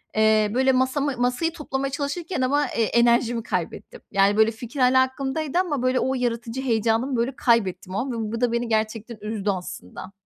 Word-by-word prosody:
Eee, 215 -1 +3
böyle, 265 +2 +3
masamı 260 +1 0
masayı 250 +7 0
toplamaya 275 -4 -3
çalışırken 290 +3 -3
ama, 285 +3 +2
eee, 230 - 0
enerjimi 235 0 +2
kaybettim. 180 -7 -4
Yani, 200 +1 +3
böyle, 220 +1 +5
fikir 235 +4 -8
hâlâ 255 +1 +5
aklımdaydı 270 +5 -1
ama, 300 -8 -1
böyle, 255 0 +2
o 260 +1 0
yaratıcı 240 0 -2
heyecanımı, 230 +1 +1
böyle, 245 +3 -1
kaybettim 195 -7 +1
o - - 0
an 260 +1 -2
ve 220 -2 -3
bu 230 - -3
da 245 -1 +2
beni 235 0 -1
gerçekten 220 +1 -2
üzdü 210 -1 -3
aslında. 185 - -6
240 Hz, 180 wpm, -24 LUFS, 220-265 Hz, -, böyle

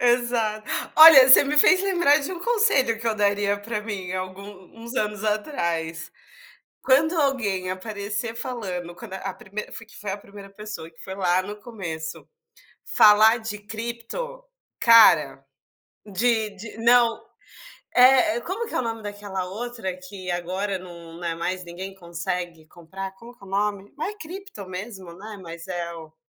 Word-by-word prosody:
Exa 240 -3 +1 0.3
olha, 310 -5 +10
você 260 - +9
me 295 +2 -1
fez 370 +5 +6
lembrar 345 -7 +3
de 295 +5 -4
um 360 - -6
conselho 360 - +2
que 230 - -5
eu 225 - +1
daria 205 0 +1
para 210 +1 -4
mim 195 -4 -5
algum 185 +1 -5 0.3
uns 235 +2 -9
anos 210 -3 -2
atrás. 170 - -2 0.7
Quando 285 +5 +3
alguém 210 -10 0
aparecer 205 +3 -4
falando 185 -9 -5
quando 190 +1 -10
a 190 0 -5
primeira 210 +2 -8
fui 230 - -8
que 220 - -17
foi 205 -2 -5
a - - -3
1ª 200 0 -13
pessoa 210 -5 -8
que 160 - -30
foi 190 - -7
lá 185 -1 +2
no 205 +2 -7
começo 165 -9 -7 0.6
falar 215 +2 +6
de 220 -1 -5
cripto, 235 - -6 0.4
cara, 160 - +6 0.6
de 220 +1 0
de 215 +2 -10
não 235 0 +4 0.7
eh 250 -2 +6
eh, - - -2
como 385 - -4
que - - -9
é - - +1
o - - +1
nome 225 -1 -4
daquela 205 -2 -5
outra 220 -1 -5
que 185 0 -8
agora 185 +3 -2
não 170 -2 -12
não 175 - -8
é 170 - -1
mais 180 +2 -3
ninguém 185 +3 -8
consegue 170 -2 -5
comprar, 190 +4 -8
como 235 +4 -14
que 235 - -16
é - - -14
o - - -12
nome? 200 0 -2
Ma 305 - -3
é 420 - -6
cripto 370 - -9
mesmo, 185 -1 -8
né, 210 +4 -9
mas 170 0 -10
é 175 -2 -4
o 160 -1 -12
205 Hz, 170 wpm, -24 LUFS, 185-235 Hz, 0.7 s, olha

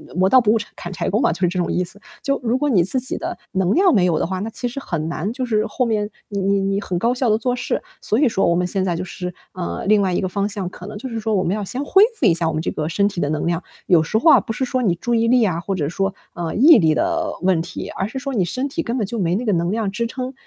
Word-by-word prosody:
磨 185 +1 +3
刀 260 - +7
不 215 -3 +3
误 225 - +4
柴 210 - -6
砍 175 +2 -7
柴 - - -2
工 215 +6 +1
嘛， - - +3
就 175 - -8
是 180 - +4
这 180 +1 -2
种 175 - 0
意 180 - +1
思。 195 +3 -7 0.2
就 275 0 0
如 235 +2 +1
果 295 +2 0
你 190 -10 +4
自 255 +8 -1
己 260 - -4
的 345 +2 -4
能 190 -1 +1
量 370 -1 +4
没 185 -5 +4
有 165 -3 +2
的 - - 0
话， 185 0 -3
那 220 +3 -3
其 245 - -2
实 245 +3 -5
很 165 - -3
难， 180 +7 -3
就 255 0 -3
是 215 -2 +1
后 250 - -1
面， 215 -2 0 0.2
你 200 -1 -3
你 195 +1 +1
你 195 +1 0
很 185 -3 -3
高 235 +4 +2
效 250 -1 0
地 215 - +3
做 250 +1 -1
事。 245 - -2 0.2
所 215 - +1
以 285 -3 +4
说 195 - +1
我 170 - +3
们 180 0 +1
现 190 +1 -1
在 175 -3 0
就 180 - -3
是， 180 0 -6 0.3
嗯， 175 - -3
另 215 -1 +5
外 190 -2 +1
一 - - 0
个 185 - -1
方 200 +2 -1
向 200 -3 -4
可 180 - -11
能 210 - -8
就 255 +5 -6
是 230 - -4
说 220 0 -1
我 185 - +2
们 185 +5 0
要 210 - -3
先 260 +8 -3
恢 385 +7 +5
复 280 - 0
一 170 - +5
下 170 -1 -1
我 160 - -1
们 155 - -1
这 - - -2
个 155 0 -3
身 200 +5 +2
体 180 - -6
的 145 - 0
能 155 +1 -1
量。 170 +1 0 0.3
有 170 -4 +5
时 215 +7 0
候 320 +5 +6
啊， - - +7
不 225 - -5
是 260 - -2
说 255 0 -1
你 185 -6 +3
注 240 +7 -1
意 230 0 +2
力 245 -1 +4
啊， 175 -5 0
或 195 +3 -3
者 150 -4 -1
说， 195 +2 -1 0.2
嗯， 170 -2 -3
毅 315 -1 +9
力 160 -5 +3
的 335 -1 0
问 180 -3 +2
题， 175 - -7
而 195 - -3
是 245 +5 -5
说 270 +1 -4
你 190 -6 +1
身 255 +10 -2
体 320 +4 -2
根 235 +2 -2
本 215 - 0
就 230 +2 -4
没 175 -2 +1
那 230 - -2
个 215 - +1
能 170 +1 0
量 220 -2 -1
支 230 +4 -2
撑。 255 +2 -5
205 Hz, 355 characters per minute, -21 LUFS, 180-245 Hz, 0.3 s, 毅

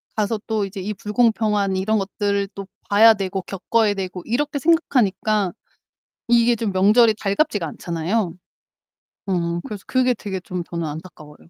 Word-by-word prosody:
가서 215 0 0
또 215 -3 0
이제 195 0 -7
이 210 +3 -3
불공평한 210 -2 +1
이런 210 +3 +1
것들을 200 0 -1
또 195 -1 -6 0.2
봐야 220 +2 +7
되고 195 -1 -3
겪어야 205 +3 0
되고 185 -2 -5
이렇게 285 +5 -1
생각하니까 215 - +1 0.7
이게 235 0 +4
좀 215 -3 -2
명절이 215 +4 +5
달갑지가 205 - 0
않잖아요. 170 +4 -2 0.9
어, 170 -2 -1
그래서 205 -2 -7
그게 255 -1 +2
되게 195 -4 -5
좀 180 -1 -5
저는 170 -1 -4
안타까워요. 155 -1 -9
205 Hz, 330 characters per minute, -21 LUFS, 185-225 Hz, 0.9 s, 봐야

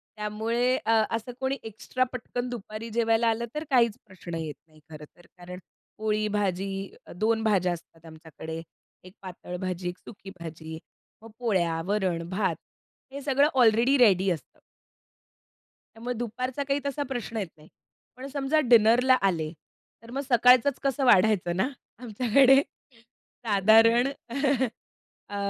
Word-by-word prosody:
त्यामुळे 225 +4 0
अ, 225 - +2 0.2
असं 230 +2 -5
कोणी 265 +1 -1
एक्स्ट्रा 225 +4 -2
पटकन 245 0 -4
दुपारी 225 -1 -7
जेवायला 230 0 +1
आलं, 225 +1 -1
तर 305 - -3
काहीच 235 -5 +3
प्रश्न 180 -3 -9
येत 155 -3 -5
नाही, 155 0 -22
खरं 150 -1 -10
तर. 175 - -20
कारण 180 +1 -9 0.4
पोळी, 215 0 0
भाजी, 195 -2 -1 0.5
2 220 +4 +1
भाज्या 190 -5 +2
असतात 165 -1 -13
आमच्याकडे, 160 0 -9 0.4
एक 185 +1 -14
पातळ 180 -1 -8
भाजी, 180 -1 -3
एक 180 - -8
सुकी 200 -2 -11
भाजी. 160 -1 -8 0.4
मग 225 - -12
पोळ्या, 175 -8 0
वरण, 185 -5 -1
भात 190 -3 0 0.6
हे 280 - -6
सगळं 280 +1 +3
ऑलरेडी 245 +2 +4
रेडी 195 -6 +4
असतं. 165 - -7 1.4
मग 245 +1 -4
दुपारचा 250 +4 -3
काही 275 +1 +1
तसा 285 +1 -2
प्रश्न 240 -3 -4
येत 200 -5 -2
नाही. 150 +1 -18 0.5
पण 265 +2 -7
समजा 280 +2 +1
डिनरला 235 +3 +6
आले, 165 -5 0 0.5
तर 230 - -12
मग 275 - -2
सकाळचंच 250 +2 +5
कसं 275 0 0
वाढायचं 190 -5 +4
ना? 220 +8 +1 0.3
आमच्याकडे 250 +4 +4
साधारण 230 -2 +1 1.2
अ, 205 - -6
220 Hz, 135 wpm, -27 LUFS, 180-245 Hz, 1.4 s, डिनरला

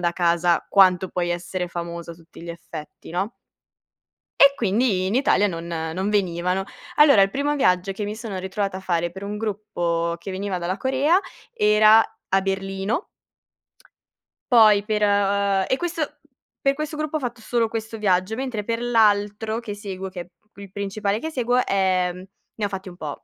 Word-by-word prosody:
da 175 -1 +1
casa, 175 -1 +2
quanto 185 -2 +4
puoi 175 -1 -2
essere 175 +1 -3
famoso 170 -1 -6
a - - -12
tutti 165 0 -16
gli 170 - -6
effetti, 165 -3 -10
no. 190 +6 -2 1.1
E 280 0 +8
quindi 210 -4 +1
in 195 +4 -1
Italia 250 -6 +3
non 165 -3 -5
non 165 +3 -3
venivano. 185 -2 0 0.3
Allora, 290 -8 +7
il 195 - +4
primo 285 +6 -1
viaggio 185 -7 +2
che 200 +2 -5
mi 210 +1 -4
sono 220 -4 -5
ritrovata 190 +1 -3
a - - -6
fare 175 -2 -1
per 190 +2 -9
un 205 +1 -4
gruppo 175 -6 -2
che 180 +3 -7
veniva 190 0 -3
dalla 180 +2 -3
Corea, 275 +7 +2 0.3
era 215 - +6 0.3
a 195 +1 +3
Berlino. 195 - -2 1.5
Poi 215 -4 +6
per 210 -1 -1
ehm 200 -1 +2
e 260 - +1
questo 330 -2 -3 0.4
per 275 0 +2
questo 305 +1 -4
gruppo 310 0 -2
ho - - -4
fatto 245 -3 -5
solo 230 0 0
questo 225 0 -5
viaggio, 190 0 +1
mentre 250 -4 -3
per 230 +2 -2
l'altro 220 -1 +2
che 220 -4 -6
seguo, 195 -2 -6
che 185 -1 -8
è 175 - -11 0.3
il 200 -2 -11
principale 200 +1 -2
che 320 - -4
seguo, 250 -4 +1
ehm, 185 -2 0 0.3
ne 210 - -2
ho - - +1
fatti 195 -1 -6
un 180 - -9
po'. 155 -5 -7
200 Hz, 175 wpm, -23 LUFS, 180-225 Hz, 1.5 s, E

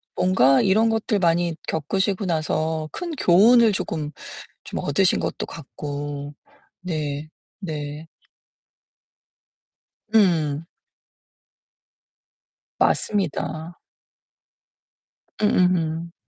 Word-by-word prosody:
뭔가 135 -8 +4
이런 220 +4 +3
것들 220 -1 0
많이 170 -1 +1
겪으시고 190 +6 -1
나서 155 -2 -1
큰 350 -1 -5
교훈을 225 +4 +5
조금 155 -6 -3 0.5
좀 - - -5
얻으신 175 +6 +2
것도 - - -3
같고 145 -1 -6 0.5
네. 155 -4 -4 0.3
네. 150 -3 -6 2.1
음. 165 -8 +3 2.1
맞습니다. 170 -3 0 1.7
음음음. 170 -5 +1
165 Hz, 140 characters per minute, -23 LUFS, 150-190 Hz, 2.1 s, 교훈을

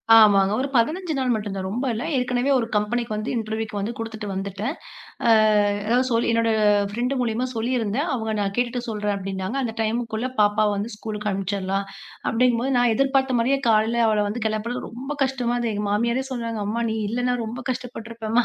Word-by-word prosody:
ஆமாங்க, 200 -3 +6
ஒரு 275 - -1
15 315 +8 +1
நாள் 255 -2 +1
மட்டும்தான், 200 -3 -4
ரொம்ப 235 +8 -2
இல்ல. 225 - -3
ஏற்கனவே 250 +2 +1
ஒரு 235 -3 -1
கம்பெனிக்கு 215 +2 0
வந்து 215 +2 -3
இன்டர்வியூக்கு 220 -1 -3
வந்து 210 +4 -2
குடுத்துட்டு 220 -2 -5
வந்துட்டேன். 200 - -3 0.5
அஹ் 210 -2 +4
அதாவது 245 +4 +2
சொல் 230 0 +2
என்னோட 230 0 +2 0.4
ஃப்ரெண்ட் 245 +5 -1
மூலியமா 235 +1 0
சொல்லிருந்தேன், 235 +4 0
அவுங்க 220 -3 -2
நான் 200 -1 -1
கேட்டுட்டு 245 0 0
சொல்றேன் 210 -2 -1
அப்படின்னாங்க. 195 +4 -4
அந்த 230 -3 -2
டைம்குள்ள 225 +2 -1
பாப்பாவ 210 0 +3
வந்து 210 +3 -4
ஸ்கூல்க்கு 210 -1 -4
அனுப்பிச்சிடலாம், 195 0 -2 0.4
அப்படிங்கம்போது 250 +2 +2
நான் 245 -2 +3
எதிர்பார்த்த 265 -1 +2
மாதிரியே, 265 +4 +2
காலைல 220 +2 +3
அவள 215 -1 +2
வந்து 225 +2 -4
கெளப்புறது 220 +3 -3
ரொம்ப 255 +5 -7
கஷ்டமா 255 -3 -1
இருந்தது. 235 -2 -1
எங்க 205 +1 -2
மாமியாரே 235 +5 +1
சொல்றாங்க, 230 -3 -3
"அம்மா, 230 +3 -1
நீ 220 - -2
இல்லன்னா 245 +2 0
ரொம்ப 230 +3 -6
கஷ்டப்பட்டுருப்பேம்மா" 230 -2 -2
225 Hz, 170 wpm, -23 LUFS, 210-245 Hz, 0.5 s, ஆமாங்க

